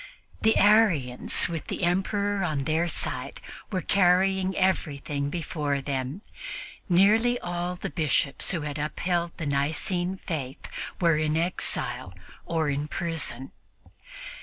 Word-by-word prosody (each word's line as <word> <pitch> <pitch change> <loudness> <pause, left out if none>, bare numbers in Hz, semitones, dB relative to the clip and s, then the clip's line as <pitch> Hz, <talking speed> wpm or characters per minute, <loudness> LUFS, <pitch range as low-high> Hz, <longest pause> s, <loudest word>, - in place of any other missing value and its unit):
The 220 0 +4
Arians, 195 - +3
with 165 -2 -5
the - - -3
Emperor 195 +3 +1
on 155 -5 0
their 160 +4 +1
side, - - -3 0.3
were 185 -3 -1
carrying 190 0 +3
everything 145 -6 0
before 150 -3 -2
them. 135 - -3 0.7
Nearly 220 +7 +5
all 175 0 -3
the 190 +2 -5
Bishops 145 -3 +1
who 175 -4 0
had 145 0 -4
upheld 170 +3 -1
the 160 - -4
Nicene 160 +6 0
faith 140 -4 -4 0.3
were 165 -3 +4
in 155 0 +1
exile 165 - -1 0.3
or 165 -2 +1
in 145 +2 -2
prison. 150 -6 -3
170 Hz, 120 wpm, -27 LUFS, 145-185 Hz, 0.7 s, Nearly